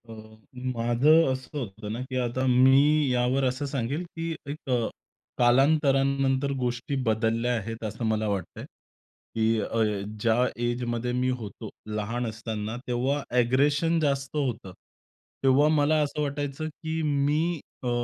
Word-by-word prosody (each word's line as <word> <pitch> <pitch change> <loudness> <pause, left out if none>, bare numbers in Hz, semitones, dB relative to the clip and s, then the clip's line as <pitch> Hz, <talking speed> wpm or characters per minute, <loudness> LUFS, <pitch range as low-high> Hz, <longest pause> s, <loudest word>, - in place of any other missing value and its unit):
अ, - - -7 0.6
माझं 130 +7 +4
असं 130 +3 -5
होतं 105 -4 -6
ना, 115 - -4
की 130 - -5
आता 125 +1 -1
मी 135 +4 +5
यावर 125 +2 +1
असं 130 +3 -1
सांगेल, 140 +4 -2
की 165 -1 -5 0.2
एक 145 -1 -7
अ, 120 -3 +1 0.5
कालांतरानंतर 135 +1 +3
गोष्टी 125 +2 -2
बदलल्या 115 +2 +1
आहेत 115 +2 -6
असं 110 +2 -4
मला 110 -1 0
वाटतंय. 100 -4 -4 0.7
की 110 0 +2
अ, 115 +2 -1 0.4
ज्या 115 +3 +3 0.2
एजमध्ये 120 0 -1
मी 130 0 +1
होतो, 105 -3 -8 0.3
लहान 115 +4 -2
असताना 110 0 -4
तेव्हा 130 +4 0
अ‍ॅग्रेशन 140 +7 +2
जास्त 140 -2 -1
होतं. 120 -9 -2 0.7
तेव्हा 135 +3 +5
मला 150 +1 +3
असं 150 +1 -3
वाटायचं, 145 +1 -3
की 160 +1 -4
मी 150 +3 +1 0.2
अ, 125 - -1
130 Hz, 135 wpm, -27 LUFS, 115-145 Hz, 0.7 s, मी